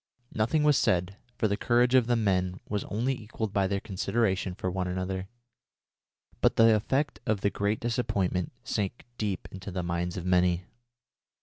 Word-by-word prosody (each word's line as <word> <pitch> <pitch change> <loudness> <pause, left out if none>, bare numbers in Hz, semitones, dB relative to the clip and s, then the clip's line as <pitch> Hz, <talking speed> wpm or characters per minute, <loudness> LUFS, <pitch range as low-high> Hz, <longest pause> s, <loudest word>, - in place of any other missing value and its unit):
Nothing 115 +8 +1
was 150 -2 +5
said, 90 +2 +1 0.2
for 110 - +2
the 100 - 0
courage 120 +3 +2
of 125 -3 +5
the 120 - +3
men 95 -4 +1
was 105 -2 -2
only 120 +6 0
equalled 110 -3 -5
by 100 -1 +2
their 100 +1 -1
consideration 95 -1 -1
for 90 -1 -2
one 90 0 -2
another, 95 +1 -3 1.1
but - - +4
the 115 0 +6
effect 130 +6 0
of 105 -3 +1
the 100 - +2
great 100 +1 0
disappointment 110 -7 -1
sank 105 -1 -3
deep 100 -4 -2
into 95 +1 -7
the 90 -1 -3
minds 85 +1 -2
of 90 - -5
many. 90 -1 +2
100 Hz, 170 wpm, -28 LUFS, 90-115 Hz, 1.1 s, the